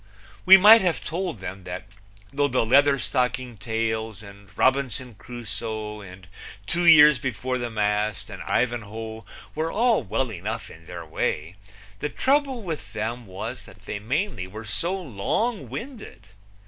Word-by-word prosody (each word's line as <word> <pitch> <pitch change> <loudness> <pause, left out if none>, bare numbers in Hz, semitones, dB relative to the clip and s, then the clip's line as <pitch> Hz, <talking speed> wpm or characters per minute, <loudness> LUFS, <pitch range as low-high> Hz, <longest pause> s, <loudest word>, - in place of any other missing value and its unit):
We 190 +1 +11
might 215 +4 +9
have 165 - 0
told 175 - -3
them 95 0 -7
that 90 - -6 0.5
though 145 +1 +2
the 125 -3 +1
Leatherstocking 130 -2 +2
Tales 110 -1 -2
and 100 -1 -14
Robinson 130 -2 +1
Crusoe 110 -2 -5
and 95 -1 -12 0.4
Two 175 - 0
Years 150 -4 +8
Before 130 -1 -2
the 120 -1 -3
Mast 105 -1 -1
and - - -8
Ivanhoe 110 -2 -2 0.3
were 160 +2 -2
all 230 -2 +3
well 125 +2 -2
enough 110 +4 -5
in 80 +1 -15
their 85 -2 -7
way, 80 +2 -2 0.4
the 150 - -2
trouble 270 - +1
with 165 -8 -6
them 115 +2 -4
was 95 0 -6
that - - -16
they 105 - -5
mainly 130 - -2
were 110 +4 -9
so 170 - 0
long 185 - -2
winded. 245 -2 -8
120 Hz, 145 wpm, -25 LUFS, 105-150 Hz, 0.5 s, We